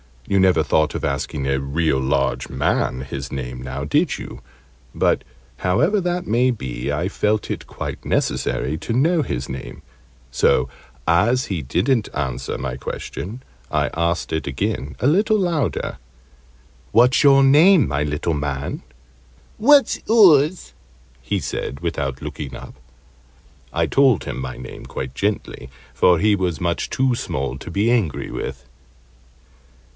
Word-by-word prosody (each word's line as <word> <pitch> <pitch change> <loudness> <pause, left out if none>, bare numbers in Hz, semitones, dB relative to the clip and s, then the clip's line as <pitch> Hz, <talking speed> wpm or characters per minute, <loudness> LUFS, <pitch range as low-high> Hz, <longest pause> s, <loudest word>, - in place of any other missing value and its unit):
You 100 - +2
never 95 -1 +4
thought 80 -2 +1
of - - -4
asking 70 0 -2
a 70 0 +1
real 70 +1 0
large 70 +1 0
man 65 - 0
his 65 +1 -6
name, 65 -2 -5
now, 65 +2 -5
did 70 - +1
you? - - -9 0.5
But, - - +2 0.3
however 155 - +2
that 180 -1 -2
may 125 -2 +2
be, 65 - -4
I 85 +6 -1
felt 105 +2 0
it - - -5
quite - - -6
necessary 60 +5 -1
to 115 - -4
know 160 +7 +3
his 65 - -4
name; 65 -1 -7 0.5
so, 65 +1 +2 0.4
as 110 +10 +2
he 90 -5 -2
didn't 105 - +1
answer 65 -5 -3
my 65 0 -4
question, 110 - -6 0.3
I - - 0
asked 85 +1 -1
it 80 - -2
again 65 0 -3
a - - 0
little 205 - +3
louder. 170 - -1 1.0
"What's 125 +4 +5
your 135 -1 +6
name, 155 +5 +6
my 75 0 -1
little 75 +3 -1
man?" 70 -2 -3 0.7
"What's 280 +4 +5
oors?" 180 -7 +5 0.5
he - - -1
said, 70 - -4
without 70 -6 -3
looking 70 -3 -6
up. - - -10 1.0
I - - +2
told 135 - +3
him - - -5
my 65 -1 -5
name 65 0 -9
quite 65 0 -6
gently, 100 - -3 0.2
for 90 -1 +4
he 105 +2 +3
was 90 -4 -2
much 85 -1 -1
too 130 -1 +1
small 65 - -3
to - - -9
be 100 +7 +1
angry 110 - 0
with. - - -5
85 Hz, 145 wpm, -21 LUFS, -, 1.0 s, your